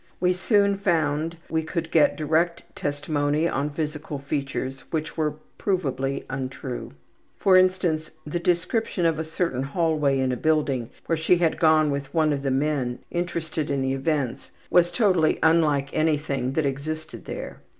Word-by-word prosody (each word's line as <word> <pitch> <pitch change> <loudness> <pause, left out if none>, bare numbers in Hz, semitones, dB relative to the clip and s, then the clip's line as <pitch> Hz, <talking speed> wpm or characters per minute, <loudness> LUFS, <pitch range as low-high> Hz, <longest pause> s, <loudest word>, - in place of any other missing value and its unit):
We 180 0 +3
soon 200 +1 +2
found 165 -3 0
we 160 - 0
could 165 +1 -4
get 160 - +4
direct 160 +3 +1
testimony 145 +2 0
on 140 -2 -1
physical 150 0 -4
features 135 -1 -3
which 155 -1 -3
were 150 -2 0 0.2
provably 135 -8 -1
untrue. 130 - -5 0.4
For 190 -2 +4
instance, 185 -4 +3 0.2
the 150 +3 -2
description 180 +2 0
of 165 -2 +2
a - - 0
certain 160 -5 -2
hallway 150 -1 +1
in 130 -1 +1
a 125 - -1
building 145 -5 +1 0.2
where 165 - 0
she 160 +3 +4
had 170 -2 +1
gone 155 -2 +4
with 140 -1 -3
one 155 -2 +3
of 140 - -2
the 135 - -1
men 135 -2 0
interested 165 -3 -2
in 140 -1 0
the 130 0 0
events 135 -2 -1 0.2
was 175 -1 +5
totally 180 -6 +3
unlike 150 -4 +3
anything 150 -4 0
that 155 +1 +1
existed 155 +4 -4
there. - - -7
155 Hz, 155 wpm, -25 LUFS, 140-170 Hz, 0.4 s, was